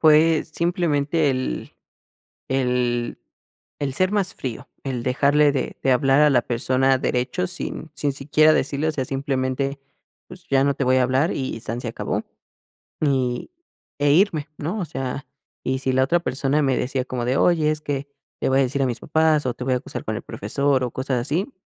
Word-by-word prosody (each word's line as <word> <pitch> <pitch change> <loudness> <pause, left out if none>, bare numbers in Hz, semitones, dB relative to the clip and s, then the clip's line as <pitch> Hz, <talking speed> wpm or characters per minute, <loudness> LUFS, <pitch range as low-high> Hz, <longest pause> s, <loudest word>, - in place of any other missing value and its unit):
Fue 155 0 +5
simplemente 160 -3 +1
el 130 0 -3 0.8
el 125 -2 0 0.6
el 135 -2 -2
ser 185 +4 +1
más 200 -3 0
frío, 125 -4 -6 0.2
el 130 -3 -3
dejarle 145 +3 +3
de 140 - -2
de 135 - +3
hablar 135 +3 +4
a 150 -1 +6
la 120 -3 +4
persona 130 +3 +1
derecho, 125 +9 -1
sin 175 -2 -5
sin 145 -2 -1
siquiera 150 +3 +4
decirle, 145 +2 0
o - - 0
sea, 135 -3 -2
simplemente: 135 +1 -2 0.5
"Pues, 180 -1 -13
ya 135 -1 +3
no 140 0 +2
te 140 - -1
voy 130 +1 +3
a 130 - +4
hablar", 130 +6 +2
y 130 -4 -3
san 115 +2 -4
se 120 - -4
acabó, 115 - -3 0.8
y 130 - 0 0.5
e, 145 0 +3
irme, 165 -4 +3
¿no? 170 +9 -3
O - - -1
sea, 135 -1 -4 0.4
y 130 0 0
si 130 - 0
la 130 +1 +3
otra 170 +6 +2
persona 140 0 0
me 135 -2 +2
decía 130 0 -1
como 125 -2 -3
de: 130 +2 +1
"Oye, 160 -3 +3
es 155 0 -2
que 140 -1 -3 0.3
le - - +1
voy 135 +1 +3
a - - +5
decir 135 +2 0
a - - +3
mis 120 -1 -3
papás, 155 -1 +2
o, 125 - -1
te 125 - -6
voy 130 0 +1
a - - +2
acusar 125 - -6
con 110 - -2
el 120 - -5
profesor", 135 +5 0
o, 125 - -2
cosas 130 0 -1
así, 165 - -2
135 Hz, 195 wpm, -23 LUFS, 130-150 Hz, 0.8 s, a